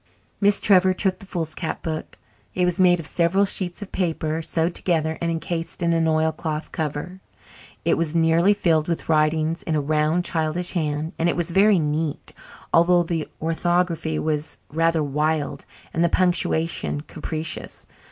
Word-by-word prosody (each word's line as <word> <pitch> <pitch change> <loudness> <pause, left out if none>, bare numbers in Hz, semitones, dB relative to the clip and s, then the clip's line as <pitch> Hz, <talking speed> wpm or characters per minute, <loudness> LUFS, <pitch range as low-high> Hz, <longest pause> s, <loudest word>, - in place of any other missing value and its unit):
Miss 205 0 +3
Trevor 190 -2 +5
took 190 0 0
the 195 - -12
foolscap 165 -2 -4
book. 155 -1 -5 0.4
It 180 - +2
was 180 +1 0
made 180 -1 +5
of 165 - -5
several 175 +5 +2
sheets 185 -1 -1
of 200 - -12
paper 160 -3 -1
sewed 165 +1 0
together 160 -3 0
and 170 - 0
encased 165 +1 -4
in 170 0 +2
an 165 -1 +2
oilcloth 160 0 -1
cover. 160 +4 -4 0.6
It - - +2
was 165 -1 -1
nearly 165 +4 +4
filled 160 -6 +2
with 170 -1 -3
writing 155 +1 +2
in 160 - +1
a - - +2
round 155 +4 +1
childish 165 +2 -1
hand 155 -1 -2
and 165 +1 +2
it - - 0
was 175 0 -1
very 200 +3 +5
neat, 155 -1 -2 0.4
although 175 +1 +5
the 165 -2 -3
orthography 165 -1 0
was 155 -1 -2
rather 165 0 +2
wild 150 +1 -1 0.3
and 165 - +1
the 170 - +3
punctuation 170 -4 0
capricious. 155 +1 -5
165 Hz, 160 wpm, -23 LUFS, 155-175 Hz, 0.6 s, Trevor